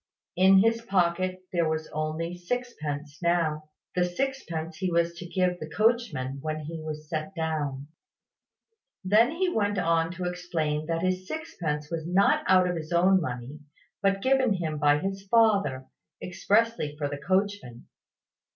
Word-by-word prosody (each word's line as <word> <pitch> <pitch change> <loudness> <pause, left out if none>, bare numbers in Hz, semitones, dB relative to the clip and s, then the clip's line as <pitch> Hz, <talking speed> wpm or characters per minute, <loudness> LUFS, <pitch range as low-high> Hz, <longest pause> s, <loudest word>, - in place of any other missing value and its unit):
In 190 +1 +6
his 230 0 +2
pocket 185 -2 0
there 170 -2 +2
was 155 0 -2
only 155 +3 -3
sixpence 160 -8 -4
now, 160 -3 0 0.2
the 180 - +2
sixpence 175 -6 -3
he 185 0 -1
was 170 0 +2
to 180 - -7
give 180 0 0
the 155 - -7
coachman 165 - 0
when 155 +1 -3
he 160 +2 -6
was 155 -1 -6
set 155 +5 -4
down. 150 -4 -2 1.2
Then 215 +6 +5
he 350 +4 0
went 205 - 0
on 165 -2 +2
to 180 0 -6
explain 170 -4 -2
that 165 0 -1
this 185 0 -1
sixpence 155 - -4
was 165 -1 -3
not 185 +3 +3
out 185 -1 +5
of 180 - -1
his 155 0 -7
own 185 +2 +4
money, 125 0 -5 0.4
but 195 0 +1
given 260 -4 +3
him 160 -5 -3
by 145 0 +4
his 195 +5 -3
father, 200 - +3 0.3
expressly 205 -3 0
for 145 -1 -1
the 145 0 -5
coachman. 190 - -1
175 Hz, 150 wpm, -27 LUFS, 155-195 Hz, 1.2 s, In